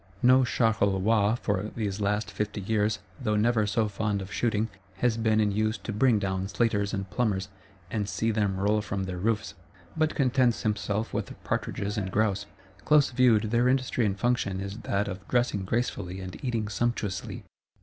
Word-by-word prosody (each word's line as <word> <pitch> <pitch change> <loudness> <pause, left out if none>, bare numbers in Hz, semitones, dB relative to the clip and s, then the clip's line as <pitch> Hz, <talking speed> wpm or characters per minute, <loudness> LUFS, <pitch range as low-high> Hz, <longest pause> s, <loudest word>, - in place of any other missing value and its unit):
No 130 +1 +6
Charolois, 110 -3 +2
for 100 0 0
these 105 -3 -2
last 105 +1 0
fifty 105 0 -3
years, 105 +1 +1 0.2
though 105 -3 0
never 110 0 +2
so 110 +2 +1
fond 105 0 -1
of 95 +1 -7
shooting, 110 -2 +1 0.3
has 115 +3 +1
been 110 -1 +2
in 105 -1 +2
use 110 +2 0
to 110 - -6
bring 115 +2 +4
down 95 -1 -1
slaters 100 -1 0
and 100 -1 -3
plumbers, 105 -5 0 0.4
and 105 -2 -1
see 110 +4 0
them 105 -3 0
roll 105 +2 +2
from 100 -2 -3
their 90 -1 -4
roofs; 110 +2 -1 0.4
but 155 -1 +1
contents 125 -3 +2
himself 105 0 -1
with - - -3
partridges 105 +2 -2
and 95 -2 -3
grouse. 100 0 0 0.4
Close 150 -3 +4
viewed, 115 -4 +3
their 120 +1 +3
industry 130 -1 +1
and 100 -2 0
function 120 -6 0
is 100 +1 -5
that 105 -3 -1
of 95 -2 -7
dressing 120 -6 +1
gracefully 95 -4 -2
and 95 -1 -8
eating 115 -5 -1
sumptuously. 105 -2 -2
105 Hz, 170 wpm, -28 LUFS, 100-115 Hz, 0.4 s, No